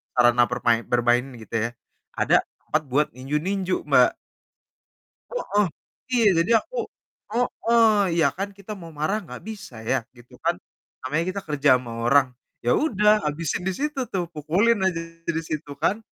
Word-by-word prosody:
sarana 120 0 +5
permai 120 -1 +2
bermain 120 0 +3 0.2
gitu 110 - -14
ya, 115 - 0 0.5
ada - - +4 0.3
tempat 155 - 0
buat 150 +3 +3
ninju-ninju, 180 +8 -1
Mbak. - - +6 1.2
Heeh, 210 - +1 0.5
iya, 235 -3 +4 0.2
jadi 175 - -4
aku - - -11 0.6
heeh, 235 -1 +2 0.4
ya - - +5
kan 195 +2 -2
kita 200 +2 -9
mau 165 -1 -10
marah 155 +8 0
enggak 125 -7 -10
bisa 205 - -8
ya, 110 - +1 0.2
gitu 120 +1 -17
kan. 170 +1 +3 0.5
Namanya 150 +6 -1
kita 200 - -3
kerja 150 -2 +1
sama 125 -2 -6
orang, 140 +1 +5 0.3
ya 120 - +1
udah, 210 -8 +3 0.2
habisin 155 +3 -2
di 190 - +1
situ 295 +5 -3
tuh, 185 -2 0
pukulin 175 +9 +2
aja 175 -3 0 0.3
di 165 -1 -1
situ 155 -2 -5
kan. 205 - +2
165 Hz, 155 wpm, -24 LUFS, 130-200 Hz, 1.2 s, Mbak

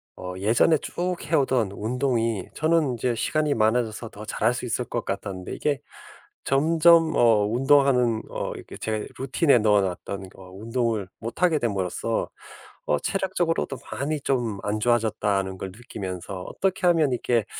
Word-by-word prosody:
어 90 0 -6
예전에 115 - +3
쭉 180 +4 -3
해오던 130 - +1
운동이 115 -2 -1
저는 155 -4 +2
이제 120 +1 0
시간이 150 +5 0
많아져서 110 0 0
더 105 +1 -10
잘할 115 +2 +1
수 125 - -4
있을 125 +1 -2
것 120 -2 -4
같았는데 95 -2 -4
이게 145 -2 -1 0.6
점점 165 +3 +4
어 110 -3 +4
운동하는 125 -2 +3
어 - - -4
이렇게 - - -10
제 110 -1 -3
루틴에 135 +2 +3
넣어 105 -2 +4
놨던 95 +1 -4
어 95 -1 -13
운동을 115 0 -2
못 115 +8 -7
하게 175 -4 +4
됨으로써 105 0 -1 0.6
'어 75 - +1
체력적으로도 175 - -1
많이 145 +2 -2
좀 120 -7 -1
안 105 +1 -1
좋아졌다.' 110 -3 +1
하는 95 -1 -3
걸 95 - -5
느끼면서 95 -4 -7
'어떻게 185 - -1
하면 160 -5 +4
이게 120 -3 +1
120 Hz, 320 characters per minute, -25 LUFS, 105-140 Hz, 0.6 s, 점점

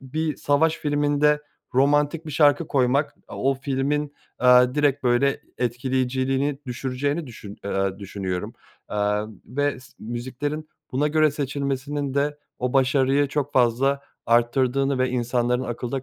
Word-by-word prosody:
bir 155 +4 -3
savaş 155 +3 +2
filminde 145 0 +2 0.3
romantik 145 +4 +2
bir - - -5
şarkı 150 +2 +4
koymak, 135 +1 +1
o 135 +1 0
filmin, 140 +2 -1 0.2
aaa, 125 0 +6
direkt, 145 -2 +2
böyle, 125 +3 +2 0.2
etkileyiciliğini 130 +3 0
düşüreceğini 135 +5 -2
düşün 105 -4 -10
eee, 95 -1 -1
düşünüyorum, 95 -2 -4 0.3
aaa, 105 +1 0 0.2
ve 145 +4 -1
s 125 - -17
müziklerin 130 +7 -4 0.2
buna 145 +4 +1
göre 155 0 +3
seçilmesinin 140 0 -3
de 145 +1 0 0.2
o 125 0 -1
başarıyı 135 +1 +3
çok 145 -1 -2
fazla 130 +3 +2 0.3
artırdığını 130 +3 +2
ve 130 - +2
insanların 125 0 0
akılda 120 +2 -4
135 Hz, 125 wpm, -24 LUFS, 125-145 Hz, 0.3 s, aaa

